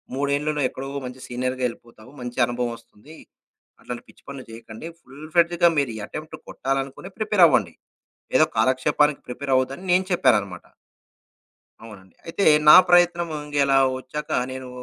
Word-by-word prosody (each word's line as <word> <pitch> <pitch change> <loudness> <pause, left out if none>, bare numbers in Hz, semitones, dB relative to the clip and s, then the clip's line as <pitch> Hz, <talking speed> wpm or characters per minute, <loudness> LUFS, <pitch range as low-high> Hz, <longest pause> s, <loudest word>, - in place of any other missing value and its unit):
మూడేండ్లలో 145 +2 -1
ఎక్కడో 135 +1 -8 0.2
మంచి 125 +1 -8
సీనియర్‌గా 125 +1 -3
ఎళ్ళిపోతావు, 115 +1 -15
మంచి 125 +1 -6
అనుభవమస్తుంది. 120 +3 -6 0.7
అట్లాంటి 120 -1 -7
పిచ్చి - - -20
పనులు 140 -2 -8
జేయకండి. 115 +5 -10
ఫుల్ 140 +4 -12
ఫ్రెడ్జ్‌గా 170 0 +4
మీరు 140 -4 -1
ఈ - - -7
అటెంప్ట్ 155 0 -8
కొట్టాలనుకొని 135 +6 -4
ప్రిపేర్ 210 -4 +2
అవ్వండి. 105 - +1 0.6
ఏదో - - +4
కాలక్షేపానికి 130 +5 +2
ప్రిపేర్ 135 +2 -3
అవ్వొద్దని" 135 +8 -1
నేను 185 +1 +2
చెప్పానన్నమాట. 100 - +1 1.2
అవునండి. 95 -5 -14
అయితే 170 +4 -2 0.2
నా - - +11
ప్రయత్నము 175 -2 +3
ఇంక 145 - -9
ఎలా 135 0 +3 0.2
ఒచ్చాక 150 +4 -7 0.2
నేను 130 0 -7
135 Hz, 135 wpm, -23 LUFS, 120-155 Hz, 1.2 s, నా